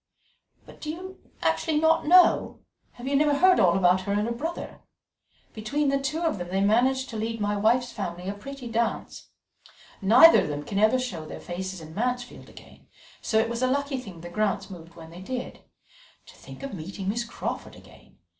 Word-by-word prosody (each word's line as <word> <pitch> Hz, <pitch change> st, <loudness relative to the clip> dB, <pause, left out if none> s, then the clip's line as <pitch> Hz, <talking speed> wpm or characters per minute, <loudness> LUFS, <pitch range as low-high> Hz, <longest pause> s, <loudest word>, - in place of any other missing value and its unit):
"But -, -, -16 dB
do 305 Hz, -, -5 dB
you 370 Hz, +4 st, -7 dB, 0.2 s
actually 315 Hz, -2 st, +1 dB
not 320 Hz, -1 st, +2 dB
know? 360 Hz, +2 st, +5 dB, 0.3 s
Have 245 Hz, +2 st, -9 dB
you 280 Hz, -, 0 dB
never 290 Hz, 0 st, +3 dB
heard 370 Hz, +5 st, +5 dB
all 180 Hz, -3 st, +4 dB
about 185 Hz, 0 st, +3 dB
her 200 Hz, +2 st, -2 dB
and 205 Hz, +1 st, +1 dB
her 235 Hz, -, -2 dB
brother? 325 Hz, +8 st, -6 dB, 0.7 s
Between 280 Hz, +7 st, -1 dB
the 275 Hz, 0 st, +1 dB
two 290 Hz, +4 st, -2 dB
of 320 Hz, -, 0 dB
them 175 Hz, -, -5 dB
they 190 Hz, +2 st, -1 dB
managed 255 Hz, +6 st, +2 dB
to 225 Hz, -, -5 dB
lead 225 Hz, +1 st, -3 dB
my 205 Hz, 0 st, 0 dB
wife's 240 Hz, +4 st, +2 dB
family 180 Hz, -2 st, -5 dB
a 200 Hz, -, -2 dB
pretty 260 Hz, +5 st, -9 dB
dance. 230 Hz, 0 st, -3 dB, 0.7 s
Neither 230 Hz, +12 st, +8 dB
of -, -, -3 dB
them 145 Hz, -1 st, -4 dB
can 200 Hz, +4 st, -3 dB
ever 215 Hz, +4 st, +4 dB
show 185 Hz, -12 st, -4 dB
their -, -, -8 dB
faces 185 Hz, 0 st, -6 dB
in 160 Hz, 0 st, -11 dB
Mansfield 245 Hz, +4 st, -3 dB
again, -, -, -16 dB, 0.3 s
so 220 Hz, -, 0 dB
it 220 Hz, +1 st, +3 dB
was 235 Hz, +1 st, -4 dB
a 255 Hz, -, +3 dB
lucky 280 Hz, 0 st, -1 dB
thing 190 Hz, -9 st, -10 dB
the 175 Hz, -, -8 dB
Grants 200 Hz, +1 st, -1 dB
moved 170 Hz, -2 st, -11 dB
when 165 Hz, -1 st, -12 dB
they 175 Hz, +2 st, -11 dB
did. 250 Hz, +5 st, -6 dB, 0.7 s
To -, -, -16 dB
think -, -, -12 dB
of 275 Hz, -, -6 dB
meeting 190 Hz, +2 st, -6 dB
Miss 230 Hz, +4 st, -1 dB
Crawford 230 Hz, -, -6 dB
again! -, -, -18 dB
225 Hz, 200 wpm, -26 LUFS, 190-275 Hz, 0.7 s, Neither